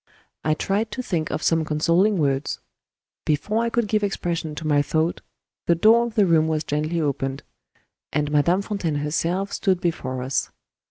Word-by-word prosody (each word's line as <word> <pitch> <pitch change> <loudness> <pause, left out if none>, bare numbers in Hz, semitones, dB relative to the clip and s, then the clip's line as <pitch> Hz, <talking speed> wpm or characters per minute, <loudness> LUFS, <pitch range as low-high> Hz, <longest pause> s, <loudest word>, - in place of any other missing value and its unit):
I 155 0 +2
tried 205 +6 -1
to 255 - -4
think 165 -8 -2
of - - -3
some 165 -1 +2
consoling 170 +7 +2
words. 140 -2 0 0.6
Before 210 +10 0
I 235 - 0
could 235 -1 0
give 210 0 +1
expression 170 -5 -2
to 160 - -6
my 145 -2 +3
thought, 160 +3 0 0.5
the 170 - +4
door 225 +7 +5
of 230 - -9
the 210 -3 +5
room 160 -3 +3
was 155 -1 0
gently 155 +3 -1
opened; 140 -2 -2 0.7
and 150 0 -1
Madame 170 +6 +3
Fontaine 195 -8 -2
herself 165 +7 -1
stood 190 -3 +1
before 130 -7 -2
us. 130 +1 -1
165 Hz, 170 wpm, -23 LUFS, 150-195 Hz, 0.7 s, door